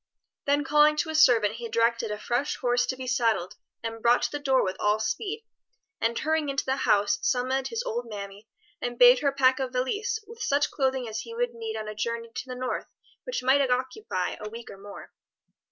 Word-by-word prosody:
Then 285 +1 +3
calling 300 +1 +4
to 315 +1 -1
a - - -5
servant 230 -8 +5
he 235 -1 -6
directed 230 0 +1
a 210 - -3
fresh 245 +6 -1
horse 245 0 +1
to 260 - -1
be 260 0 -7
saddled 225 -7 0 0.3
and 225 0 -5
brought 240 +1 +4
to - - 0
the 290 - -3
door 270 -2 +2
with 185 -1 -2
all 210 +1 +2
speed, 405 - -3 0.6
and 230 +1 +1
hurrying 315 -1 0
into 275 0 -1
the 265 +1 0
house, 205 -4 +2
summoned 260 +1 0
his 460 +1 -3
old 235 +1 -4
mammy 200 0 -8 0.3
and 245 0 -3
bade 245 +1 +8
her 280 -2 +1
pack 265 -1 +3
a 265 - 0
valise 260 - -1
with 455 +1 -12
such 290 +1 +1
clothing 265 -3 0
as 220 +1 -4
he 460 - -8
would 485 0 -1
need 450 -1 -5
on 215 - -5
a 215 - -5
journey 230 +2 -3
to 250 +1 -6
the 255 - -6
North 255 0 -3 0.4
which - - -3
might 265 +2 +4
occupy 250 - -2
a 210 - -5
week 230 +1 -9
or - - -11
more. 200 0 -11
250 Hz, 215 wpm, -27 LUFS, 230-290 Hz, 0.6 s, bade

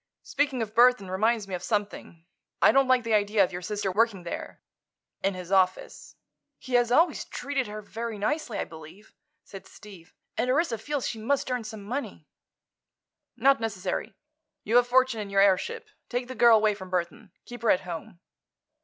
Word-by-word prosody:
"Speaking 275 -4 -1
of 215 -1 -8
Burthon 235 -5 +4
reminds 215 +2 +1
me 190 - -8
of 180 - -3
something. 200 -4 -4 0.3
I - - +6
don't 270 -1 +3
like 255 -1 +3
the 230 -1 -1
idea 205 0 +3
of 185 - -1
your 180 -1 -6
sister 205 +1 -3
working 205 -2 +1
there—in 190 +2 -7
his 180 0 -8
office." 185 -1 0 0.4
"He 255 - -10
has 240 -1 +3
always 330 +7 +3
treated 275 -4 -3
her 210 0 -7
very 225 +1 -5
nicely, 235 +2 -2
I - - -1
believe," 165 +6 -14 0.3
said 195 - -12
Steve, 190 -6 -15 0.2
"and 250 - -1
Orissa 260 -4 +1
feels 285 +4 -3
she 225 - -5
must 260 +3 -1
earn 250 -3 -2
some 215 -2 -8
money." 255 +8 -5 1.1
"Not 275 0 +4
necessary. 200 -1 -4 0.5
You've 230 +4 +4
a - - +2
fortune 255 -1 +2
in 205 - -6
your 195 0 +1
airship. 200 - +1 0.2
Take 245 0 -2
the 260 - -6
girl 235 -3 +6
away 215 -1 +2
from 190 -2 -10
Burthon. 180 +3 -3 0.2
Keep 240 -1 -10
her 230 - +1
at 180 - +4
home." 170 -1 -8
215 Hz, 180 wpm, -27 LUFS, 195-245 Hz, 1.1 s, I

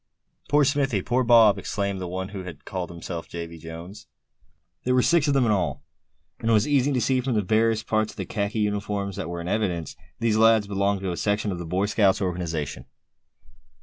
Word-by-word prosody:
"Poor 145 0 +4
Smithy; 135 -8 +1
poor 125 +2 +1
Bob!" 115 -4 +6
exclaimed 100 -2 -3
the 90 - -3
one 95 +2 -4
who 100 -2 -6
had 90 -5 -10
called 90 -2 -4
himself 85 0 -7
Davy 85 -1 -7
Jones. 85 +5 -10 0.8
There 125 0 +1
were 125 - +4
six 165 -3 +3
of 140 - +2
them 135 -3 +3
in 110 - +2
all, 95 -5 -1 0.6
and 115 - -2
it - - +4
was 105 +3 +3
easy 145 -1 +2
to 130 - +1
see 130 +2 +1
from 125 -2 -1
the 105 - +1
various 110 +2 +2
parts 110 -1 0
of - - -23
the - - -3
khaki 105 +1 -2
uniforms 100 -1 -2
that 90 -4 -4
were 85 0 -4
in 85 - -6
evidence, 90 -5 -1 0.2
these 115 -2 +1
lads 110 -1 +5
belonged 100 0 0
to 95 -2 -2
a 85 - -4
section 105 0 0
of 90 - -4
the 85 - -6
Boy 95 +4 0
Scout 100 -2 +2
organization. 85 -6 -3
100 Hz, 215 wpm, -25 LUFS, 90-115 Hz, 0.8 s, Bob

